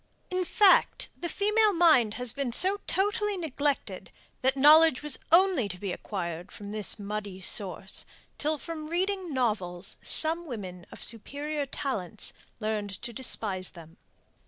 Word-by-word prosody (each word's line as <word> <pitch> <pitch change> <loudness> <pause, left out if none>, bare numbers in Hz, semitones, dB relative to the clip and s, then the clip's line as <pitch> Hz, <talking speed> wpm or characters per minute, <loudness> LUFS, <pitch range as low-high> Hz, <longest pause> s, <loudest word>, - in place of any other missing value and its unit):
In 365 0 -1
fact, 400 +2 +3
the 345 - -6
female 420 +3 +1
mind 310 - +3
has 250 -2 -3
been 275 -3 -3
so 385 - +3
totally 415 +1 0
neglected, 290 -4 -3 0.3
that 265 +1 +1
knowledge 300 0 +5
was 300 -3 0
only 345 - +3
to 180 - -5
be 195 0 -5
acquired 175 -2 -6
from 205 0 -9
this 215 0 +2
muddy 205 -2 -6
source, 190 0 -1 0.3
till 305 +1 0
from 310 0 -8
reading 370 +1 -2
novels 200 -8 -3
some 330 +2 +7
women 185 - -8
of - - -5
superior 285 +5 -4
talents 215 -8 -3 0.3
learned 210 -3 -4
to 235 - -5
despise 205 -6 +1
them. 165 -2 -15
260 Hz, 140 wpm, -27 LUFS, 205-330 Hz, 0.3 s, some